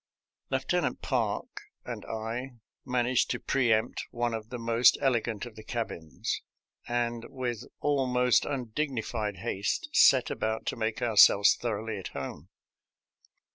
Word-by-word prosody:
Lieutenant - - -1
Park - - -2 0.2
and - - -6
I 115 +4 -4 0.3
managed 125 0 +1
to - - -1
pre 125 -4 +1
empt 110 +2 0
one 120 0 -1
of 110 0 -5
the 125 - -5
most 115 +1 +4
elegant 120 -5 0
of 120 -3 -11
the 110 - -11
cabins, 100 -9 -4 0.5
and 120 -1 -1
with 125 -4 -4 0.2
almost 125 -4 +3
undignified 120 -5 -3
haste 95 +2 -2
set - - +6
about 110 0 -2
to - - -2
make 110 +2 -2
our 115 -3 -1
selves 100 +1 +8
thoroughly 110 -2 -3
at 95 - -6
home. - - -6
115 Hz, 135 wpm, -29 LUFS, 110-125 Hz, 0.5 s, selves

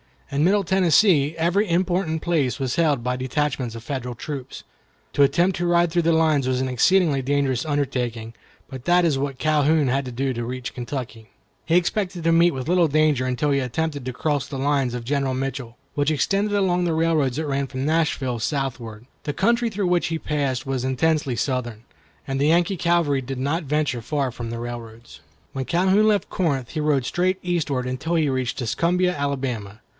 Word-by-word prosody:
In 140 +3 +1
Middle 200 +2 +3
Tennessee 175 -4 +3
every 180 +5 +1
important 175 -2 0
place 145 -8 0
was 130 0 -2
held 150 -7 +2
by 125 +1 -1
detachments 130 -2 -2
of 115 - -8
Federal 125 -1 -4
troops. 135 +1 -7 0.5
To 145 - +4
attempt 170 +7 +2
to 175 0 -1
ride 175 -1 +3
through 175 +1 +2
the 165 +1 +3
lines 155 -4 +2
was 130 0 0
an 130 - -1
exceedingly 150 +3 +3
dangerous 135 -1 0
undertaking, 125 -6 -2 0.3
but 130 -1 -9
that 175 0 +4
is 150 -5 +2
what 135 -1 -3
Calhoun 155 -1 +2
had 135 +2 0
to 125 - -6
do 130 +2 -1
to 120 -1 -4
reach 125 +1 -5
Kentucky. 120 -3 -6 0.4
He 165 - +1
expected 180 -1 0
to 165 - +3
meet 170 +1 +5
with 130 0 -5
little 175 -2 +4
danger 150 -3 +2
until 130 +3 0
he 140 - +2
attempted 145 +2 -3
to 130 - -3
cross 145 +1 -1
the 140 - -6
lines 135 -2 0
of 120 -1 -4
General 135 +1 -1
Mitchell, 130 -2 -4 0.2
which 145 0 +1
extended 200 +7 0
along 180 -3 +1
the 170 - 0
railroads 160 -6 +1
that 160 +2 -2
ran 140 -1 -1
from 130 0 -4
Nashville 150 -6 0
southward. 120 -4 -3 0.2
The 145 - -3
country 235 +8 +2
through 205 -3 -2
which 175 -1 +2
he 165 - -2
had 160 - -6
to - - -16
pass 140 -3 -1
was 130 -2 -2
intensely 140 0 +1
Southern, 120 -3 -2 0.4
and 135 0 -3
the 145 - +2
Yankee 175 +4 +2
cavalry 170 -5 +1
did 135 +1 -5
not 145 +6 -1
venture 145 -4 0
far 140 +2 -1
from 120 -1 -6
the 115 0 -5
railroads. 115 -8 -8 0.3
When 135 -1 -4
Calhoun 190 +6 +3
left 210 -2 +1
Corinth, 140 -9 -1
he 160 - -4
rode 150 -4 +1
straight 185 +4 0
eastward, 155 -8 -1
until 130 +7 -2
he 155 -3 +2
reached 130 -2 -2
Tuscumbia, 175 +9 +1
Alabama. 130 -7 -3
140 Hz, 195 wpm, -23 LUFS, 130-165 Hz, 0.5 s, meet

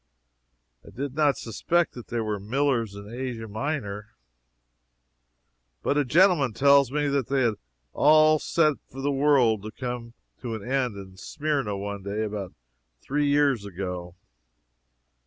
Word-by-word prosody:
I - - -14
did 135 +1 -5
not 150 -1 +2
suspect 170 +9 0
that 120 - -10
there 115 -1 -2
were 105 -1 -2
Millers 115 -1 0
in 100 0 -9
Asia 120 -1 -5
Minor, 110 -3 -4 1.7
but - - +1
a 145 - +3
gentleman 155 - +4
tells 140 +2 +5
me 145 0 0
that 140 -3 0
they 135 -1 +1
had 115 -2 +2
it - - -17 0.3
all 155 +1 +5
set 155 -3 +2
for 135 - -10
the 140 +1 0
world 135 -6 +3
to 110 - -7
come 120 0 -6 0.3
to 115 -3 -4
an 110 +1 -8
end 130 -5 0
in 95 -1 -11
Smyrna 140 -6 -2
one 100 0 -5
day 100 +3 -3
about 105 -3 -5 0.5
three 145 - -1
years 140 -5 +2
ago. 90 -2 -6
125 Hz, 150 wpm, -26 LUFS, 105-145 Hz, 1.7 s, tells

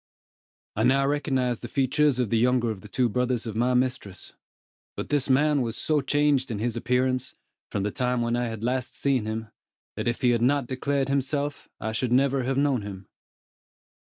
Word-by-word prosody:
I 110 - -1
now 135 +4 +4
recognized 135 -4 0
the 120 - -5
features 140 +2 +2
of 125 -5 -1
the 115 - +3
younger 125 -1 +2
of 100 -3 -7
the 105 - -11
two 125 +4 +1
brothers 125 +1 -1
of 110 -2 -5
my 125 +3 +2
mistress; 125 -6 -2 0.6
but - - -4
this 145 -2 0
man 145 +2 +3
was 115 -2 -3
so 155 -2 +1
changed 145 -1 +2
in 110 - -3
his 115 +3 -1
appearance, 125 +2 0 0.3
from 100 - -2
the 105 - -1
time 125 0 0
when 120 0 0
I 120 0 0
had 110 -1 -6
last 125 +1 -1
seen 135 -5 +1
him, 110 0 -4 0.5
that - - -3
if 120 +4 -1
he 125 -2 +4
had 120 -1 +1
not 140 +2 +2
declared 135 +2 -1
himself, 140 +1 -1
I 110 - -3
should 115 +2 -1
never 135 +1 +3
have 135 +1 -1
known 140 -4 +2
him. 100 -2 -8
125 Hz, 195 wpm, -26 LUFS, 115-135 Hz, 0.6 s, now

